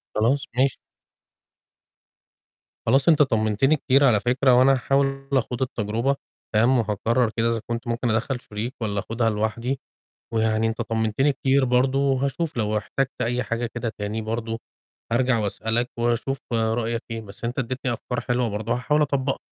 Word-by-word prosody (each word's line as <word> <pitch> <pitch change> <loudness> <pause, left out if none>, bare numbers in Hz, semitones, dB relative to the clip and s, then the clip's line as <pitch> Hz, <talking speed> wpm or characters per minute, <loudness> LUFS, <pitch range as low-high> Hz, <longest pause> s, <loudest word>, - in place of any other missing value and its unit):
خلاص 130 +6 +2
ماشي. 135 0 +3 2.1
خلاص 135 +5 +4
أنت 155 -2 +5
طمنتني 110 +2 +3
كتير 140 -1 +3
على 110 -6 +5
فكرة، 125 +3 +3
وأنا 130 +2 +6
هاحاول 135 +1 0
أخوض 125 -1 0
التجربة 120 +2 0 0.4
فاهم، 120 +4 +4
وهاقرر 115 +3 +1
كده 115 +1 +2
إذا 115 -2 -1
كنت 115 0 -3
ممكن 120 +1 -1
أدخّل 115 +4 0
شريك 110 +4 -5
والّا 100 -2 -1
أخوضها 115 +2 0
لوحدي، 115 +5 -1 0.6
ويعني 110 0 +2
أنت 115 +1 -1
طمنتني 115 +5 +1
كتير 135 +1 +2
برضه 130 +2 +2
وهاشوف 140 +3 0
لو 105 -1 0
احتجت 135 +6 -3
أي 125 +2 0
حاجة 115 +1 -2
كده 120 -1 -2
تاني 105 +2 -3
برضه 115 +1 -3 0.5
أرجع 125 -1 +3
وأسألك 110 +3 -1
وأشوف 120 +3 0
رأيك 115 +1 0
إيه، 115 0 -3
بس 100 +1 -11
أنت 120 +2 -3
اديتني 130 0 -2
أفكار 125 +1 -3
حلوة 120 -1 0
برضه 105 +2 -2
هاحاول 150 +5 +1
أطبّقها. 135 -1 0
120 Hz, 150 wpm, -24 LUFS, 110-135 Hz, 2.1 s, وأنا